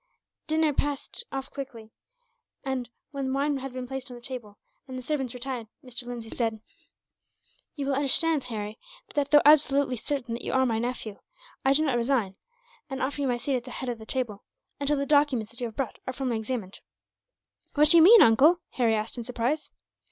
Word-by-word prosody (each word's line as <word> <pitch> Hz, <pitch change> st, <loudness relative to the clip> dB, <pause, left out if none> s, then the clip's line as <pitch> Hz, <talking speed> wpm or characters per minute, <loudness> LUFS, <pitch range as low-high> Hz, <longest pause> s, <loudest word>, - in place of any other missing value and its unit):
Dinner 315 Hz, -1 st, +2 dB
passed 290 Hz, -, -3 dB
off 270 Hz, 0 st, -5 dB
quickly, 235 Hz, -6 st, -8 dB, 0.7 s
and 265 Hz, -3 st, -3 dB, 0.2 s
when 275 Hz, -2 st, -2 dB
wine 280 Hz, +1 st, +1 dB
had 270 Hz, 0 st, -6 dB
been 255 Hz, 0 st, -5 dB
placed 265 Hz, +1 st, -6 dB
on 250 Hz, -, -8 dB
the 240 Hz, -, -11 dB
table, 240 Hz, -5 st, -8 dB, 0.3 s
and 260 Hz, -1 st, -6 dB
the -, -, -5 dB
servants 265 Hz, -4 st, -2 dB
retired, 250 Hz, -2 st, -4 dB, 0.2 s
Mr. 245 Hz, -1 st, -4 dB
Lindsay 235 Hz, -2 st, -6 dB
said: 225 Hz, -2 st, -1 dB, 1.2 s
"You 285 Hz, -3 st, -3 dB
will 275 Hz, -, 0 dB
understand, 285 Hz, +1 st, +3 dB
Harry, 215 Hz, -2 st, -5 dB, 0.3 s
that 290 Hz, -2 st, +1 dB
although 295 Hz, -1 st, +7 dB
absolutely 285 Hz, -3 st, +5 dB
certain 245 Hz, 0 st, -3 dB
that 235 Hz, -, -5 dB
you -, -, -3 dB
are 260 Hz, 0 st, +4 dB
my 225 Hz, -3 st, 0 dB
nephew, 235 Hz, -3 st, -4 dB, 0.4 s
I 270 Hz, -, +4 dB
do 305 Hz, +3 st, +3 dB
not 265 Hz, -5 st, +1 dB
resign, 235 Hz, -6 st, 0 dB, 0.5 s
and 270 Hz, -1 st, -4 dB
offer 285 Hz, +2 st, -2 dB
you 275 Hz, -, +1 dB
my 245 Hz, -1 st, +1 dB
seat 260 Hz, +2 st, -1 dB
at 240 Hz, -, -6 dB
the 250 Hz, -, -10 dB
head 250 Hz, +1 st, -4 dB
of 235 Hz, -2 st, -4 dB
the 220 Hz, -, -11 dB
table, 235 Hz, -6 st, -3 dB, 0.4 s
until 285 Hz, +1 st, +1 dB
the 280 Hz, -, 0 dB
documents 280 Hz, -7 st, +2 dB
that 235 Hz, -, -6 dB
you 240 Hz, -, 0 dB
have 220 Hz, -, -11 dB
brought 265 Hz, -5 st, -3 dB
are 260 Hz, -, -2 dB
formally 255 Hz, -3 st, -1 dB
examined." 220 Hz, -4 st, -4 dB, 1.0 s
"What 300 Hz, 0 st, +6 dB
do 340 Hz, -, +8 dB
you -, -, +9 dB
mean, 420 Hz, +6 st, +9 dB
uncle?" 290 Hz, +10 st, +6 dB
Harry 230 Hz, -3 st, +2 dB
asked, 215 Hz, +3 st, -3 dB
in -, -, -4 dB
surprise. 250 Hz, +6 st, -2 dB
260 Hz, 200 wpm, -27 LUFS, 235-280 Hz, 1.2 s, you